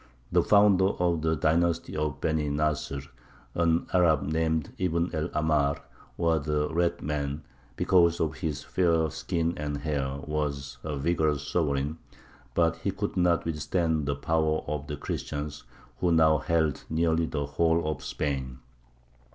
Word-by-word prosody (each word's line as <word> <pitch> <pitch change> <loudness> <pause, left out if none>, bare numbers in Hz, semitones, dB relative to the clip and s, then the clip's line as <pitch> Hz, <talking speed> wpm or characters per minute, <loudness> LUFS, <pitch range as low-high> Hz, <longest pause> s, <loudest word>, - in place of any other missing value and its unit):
The - - +4
founder 100 -2 +5
of 85 -2 +1
the 80 0 +1
dynasty 85 +2 +1
of 75 -2 -2
the - - +1
Beny 80 -2 0
Nasr, 75 -2 -1 0.5
an 85 0 +2
Arab 85 -5 +4
named 80 0 -1
Ibn 85 -1 0
el 80 +1 -1
Ahmar, 75 -2 +1 0.4
or 85 -2 +2
the 75 +1 -1
"Red 85 +1 0
man," 70 0 -2 0.3
because 85 +1 +3
of 80 -1 -1
his 75 -4 -3
fair 85 -4 +1
skin 80 +1 -1
and 75 -1 -3
hair, 70 -3 -2
was 70 -3 -3
a 75 -2 -3
vigorous 75 -1 0
sovereign, 75 -1 0 0.6
but 85 -1 +2
he 85 - -2
could 100 +2 -3
not 90 -2 +2
withstand 80 -1 0
the 70 - 0
power 80 +1 0
of 75 0 -4
the 75 -1 -4
Christians, 75 +1 -5 0.3
who 90 - +2
now 80 -2 +5
held 80 -4 0
nearly 80 0 +1
the 75 -2 -2
whole 80 +3 +1
of 80 - -3
Spain. 65 -3 -3
80 Hz, 150 wpm, -28 LUFS, 75-85 Hz, 0.6 s, founder